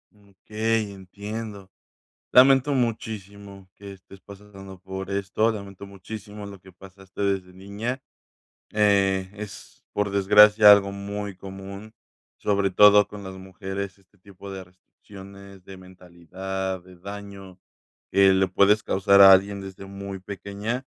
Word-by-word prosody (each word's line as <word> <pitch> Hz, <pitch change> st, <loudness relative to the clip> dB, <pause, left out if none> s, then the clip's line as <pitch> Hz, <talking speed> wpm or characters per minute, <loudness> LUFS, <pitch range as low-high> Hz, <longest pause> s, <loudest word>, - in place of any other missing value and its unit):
Okey, 105 Hz, +2 st, -3 dB
entiendo. 100 Hz, +1 st, -8 dB, 0.6 s
Lamento 135 Hz, +2 st, +5 dB
muchísimo 100 Hz, -5 st, -5 dB
que 100 Hz, -1 st, -10 dB
estés 95 Hz, 0 st, -16 dB
pasando 95 Hz, -1 st, -13 dB
por 95 Hz, 0 st, -7 dB
esto, 100 Hz, +3 st, 0 dB
lamento 100 Hz, -2 st, -9 dB
muchísimo 105 Hz, +2 st, -10 dB
lo 100 Hz, -1 st, -10 dB
que 95 Hz, +1 st, -18 dB
pasaste 95 Hz, +1 st, -11 dB
desde 95 Hz, -2 st, -2 dB
niña, 100 Hz, +7 st, -6 dB, 0.7 s
eh, 100 Hz, -3 st, +2 dB
es, 105 Hz, -1 st, -11 dB
por 105 Hz, -1 st, -1 dB
desgracia, 105 Hz, +2 st, +6 dB
algo 100 Hz, -1 st, +4 dB
muy 100 Hz, 0 st, -6 dB
común, 100 Hz, +3 st, -10 dB, 0.5 s
sobre 100 Hz, -1 st, 0 dB
todo 105 Hz, +1 st, +6 dB
con 105 Hz, 0 st, -10 dB
las 95 Hz, -1 st, -8 dB
mujeres, 95 Hz, +1 st, -7 dB
este 100 Hz, +1 st, -31 dB
tipo 100 Hz, +1 st, -13 dB
de 95 Hz, -1 st, -7 dB
restricciones, 100 Hz, +1 st, -15 dB
de 95 Hz, -, -11 dB
mentalidad, 95 Hz, +1 st, -7 dB
de 90 Hz, +1 st, -17 dB
daño 100 Hz, -1 st, -10 dB, 0.5 s
que 95 Hz, -1 st, +5 dB
le 95 Hz, 0 st, +2 dB
puedes 100 Hz, +3 st, +3 dB
causar 100 Hz, 0 st, +3 dB
a 95 Hz, 0 st, +10 dB
alguien 100 Hz, +1 st, +3 dB
desde 95 Hz, 0 st, -10 dB
muy 100 Hz, 0 st, -8 dB
pequeña. 100 Hz, +6 st, -5 dB
100 Hz, 130 wpm, -24 LUFS, 95-105 Hz, 0.7 s, a